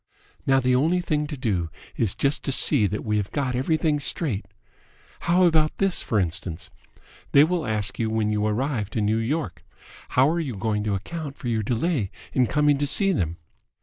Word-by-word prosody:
"Now 135 0 +5
the 125 -1 +2
only 160 +8 +2
thing 150 -4 -1
to 145 - -6
do 100 -10 -1 0.3
is 110 -6 0
just 140 +1 +1
to 140 - 0
see 130 -4 +4
that 105 +2 -4
we 105 -1 +1
have 105 -1 -2
got 130 -4 -1
everything 155 +3 +1
straight. 135 - 0 0.8
How 180 +2 +5
about 160 -3 +3
this, 195 -2 +1
for 110 - 0
instance? 85 -2 -3 0.6
They 140 - +8
will 170 0 0
ask 105 -2 -2
you 110 -1 0
when 110 -1 0
you 105 0 0
arrived 110 -2 -2
in 105 - +1
New 110 +2 +1
York. 115 - -3 0.5
How 130 +2 +4
are 170 - -1
you 140 -8 -3
going 105 +1 -1
to 105 -2 0
account 145 - -6
for 120 - -4
your 110 -2 0
delay 115 - -1 0.2
in 125 -2 +3
coming 145 +3 +2
to 145 - 0
see 195 +7 +2
them?" 85 - -1
125 Hz, 195 wpm, -24 LUFS, 105-150 Hz, 0.8 s, They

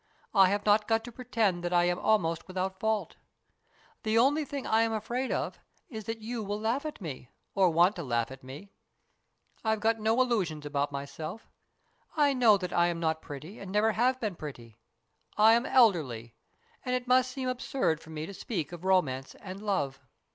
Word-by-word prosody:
I 195 -3 +6
have 205 +1 -1
not 210 0 +4
got 225 0 +2
to 240 - -8
pretend 225 -7 -1
that 175 - -2
I 175 -1 +4
am 175 0 +1
almost 165 -7 +1
without 190 0 -3
fault. 220 0 -1 0.8
The 220 0 +1
only 280 +6 +4
thing 280 -1 -5
I 220 +1 +3
am 225 0 +1
afraid 240 +4 -2
of - - -2 0.3
is 220 -4 -7
that 225 +1 -3
you 235 +1 -3
will 205 0 -3
laugh 235 +8 -1
at 300 - -8
me, 130 -7 -7 0.2
or 190 -2 +4
want 175 +5 +3
to 170 - -4
laugh 120 -2 -1
at 135 0 -11
me. 145 +10 -10 0.9
I've 220 -1 +1
got 225 +1 +1
no 220 +3 +2
illusions 190 -12 0
about 145 -1 -1
myself. 155 +8 -6 0.7
I 290 -2 +4
know 235 -5 +5
that 180 -2 -5
I 175 0 +4
am 170 -1 -2
not 160 -1 0
pretty 150 +8 -9
and 195 -2 -8
never 210 +2 +3
have 250 +4 +1
been 215 -6 -2
pretty. 120 -8 -9 0.6
I 220 +1 +7
am 235 +2 +2
elderly, 150 - +3 0.5
and 250 -1 0
it 250 0 -3
must 255 0 +4
seem 260 0 -4
absurd 245 - -1
for 160 - -15
me 155 0 -5
to 200 - -8
speak 180 -6 -4
of 175 0 -9
romance 145 -9 +1
and 190 0 -9
love." 185 -11 -1
200 Hz, 195 wpm, -29 LUFS, 165-225 Hz, 0.9 s, I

